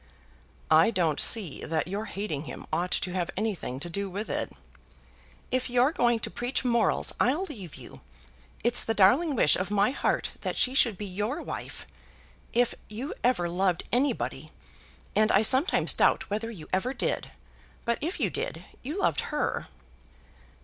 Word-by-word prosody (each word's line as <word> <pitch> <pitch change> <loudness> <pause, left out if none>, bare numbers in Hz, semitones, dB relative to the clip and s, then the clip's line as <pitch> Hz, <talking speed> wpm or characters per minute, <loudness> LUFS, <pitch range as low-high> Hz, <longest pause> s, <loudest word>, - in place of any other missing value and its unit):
"I 160 +5 +7
don't 170 -9 +1
see 195 -11 +2
that 160 +1 -1
your 200 +4 -3
hating 190 -9 -4
him - - -8
ought 175 +3 0
to 180 - -1
have 180 -2 -1
anything 195 - -2
to 175 - -4
do 200 +3 -3
with 205 +4 -4
it." - - -2 1.0
"If 255 0 0
you're 250 +3 +4
going 240 -6 +2
to - - -2
preach 245 +2 -2
morals, 235 -2 +2
I'll 285 +10 +2
leave 210 - -8
you. - - -12 0.6
It's 240 +1 +2
the 225 - -1
darling 270 - +5
wish 150 - +5
of 185 +2 -2
my 205 +3 +3
heart - - 0
that - - -3
she 255 - +3
should 235 -7 +4
be 210 - -5
your 210 - -3
wife. - - -6 0.7
If 245 0 +2 0.2
you 235 +7 -5
ever 235 -8 +2
loved 180 0 +1
anybody, 260 +5 0 0.7
and 215 +1 +4
I 195 - +5
sometimes 265 - +4
doubt - - +2
whether 215 +2 -2
you 180 -9 -9
ever 245 +8 0
did, - - -1 0.6
but 235 0 +1
if 330 +6 -3
you - - +1
did, - - -4 0.2
you 295 +8 -5
loved - - +2
her." - - -1
215 Hz, 165 wpm, -28 LUFS, 185-250 Hz, 1.0 s, I